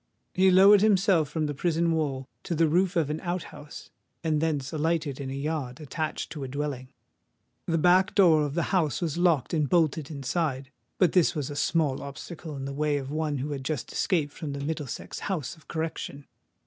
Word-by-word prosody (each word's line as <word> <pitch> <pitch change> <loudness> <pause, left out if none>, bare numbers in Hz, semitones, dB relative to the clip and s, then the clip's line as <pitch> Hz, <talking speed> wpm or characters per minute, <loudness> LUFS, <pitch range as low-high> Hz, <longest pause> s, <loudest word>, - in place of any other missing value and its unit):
He 190 +1 +4
lowered 195 +2 +7
himself 195 -7 +3
from 155 0 -1
the 145 - -2
prison 165 +3 +1
wall 140 -5 -1
to 170 - -3
the 165 +1 +3
roof 180 +4 +2
of 155 -4 +1
an 155 - -3
out 175 -1 -3
house, 145 0 -11 0.3
and 155 -2 +1
thence 150 -3 -1
alighted 155 -3 -1
in 135 - -4
a 135 - -4
yard 140 -3 -3
attached 155 +1 -4
to 150 -3 -5
a - - -4
dwelling. 135 -1 -4 0.8
The 165 - +1
back 180 +4 +4
door 170 -6 +6
of 145 -1 -2
the 170 - +1
house 160 -6 +2
was 170 -2 -2
locked 170 -7 +2
and 150 -4 +1
bolted 160 -4 +2
inside: 140 -2 -2 0.3
but 180 -4 +4
this 180 -4 +3
was 150 -2 -3
a - - -6
small 150 -3 +1
obstacle 155 +3 -8
in 135 -1 -5
the 140 - -4
way 150 0 0
of 135 -1 -5
one 155 -1 -1
who 140 +3 -3
had 135 -2 -4
just 145 -2 -3
escaped 150 -6 0
from 150 -4 -5
the 140 - -5
Middlesex 150 -3 -4
House 170 -8 -3
of 160 -3 -22
Correction. 160 -3 -4
155 Hz, 200 wpm, -27 LUFS, 140-170 Hz, 0.8 s, lowered